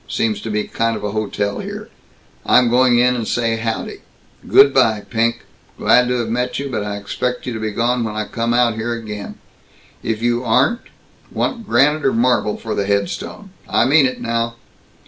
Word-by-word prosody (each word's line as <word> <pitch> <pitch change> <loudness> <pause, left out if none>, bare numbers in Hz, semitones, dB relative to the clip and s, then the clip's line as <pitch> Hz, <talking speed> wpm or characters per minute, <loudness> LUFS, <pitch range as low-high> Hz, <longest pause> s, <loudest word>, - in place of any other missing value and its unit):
Seems 110 -3 -1
to 115 - -6
be 105 0 -1
kind 115 0 -1
of - - -9
a 105 - -2
hotel 100 -1 -2
here. - - -7 0.6
I'm 125 -2 +4
going 125 0 +4
in 125 +1 +3
and 115 -3 -3
say 115 -1 0
howdy. 115 0 -4 0.5
Good 140 0 +6
by, 110 -5 +3
Pink. 115 0 0 0.4
Glad 125 0 +4
to 125 - 0
have 120 -2 -2
met 125 +2 -1
you, 140 0 -4
but 110 -4 -2
I 105 0 -4
expect 125 +5 -3
you 125 - -3
to 110 - -5
be 110 0 -2
gone 120 +3 0
when 110 -1 -4
I 110 0 -2
come 115 +2 -2
out 120 -1 +3
here 110 +2 -3
again. 105 -3 -7 0.7
If 110 0 -3
you 120 +1 +1
aren't 130 - +2 0.5
Want 230 -3 -3
granite 145 +6 +3
or 135 - +2
marble 120 -2 +1
for 110 - -5
the 100 - -2
headstone? 100 - -3 0.2
I 110 - +3
mean 140 +1 +5
it, 130 - -5
now!" 115 0 -2
115 Hz, 195 wpm, -19 LUFS, 110-125 Hz, 0.7 s, Good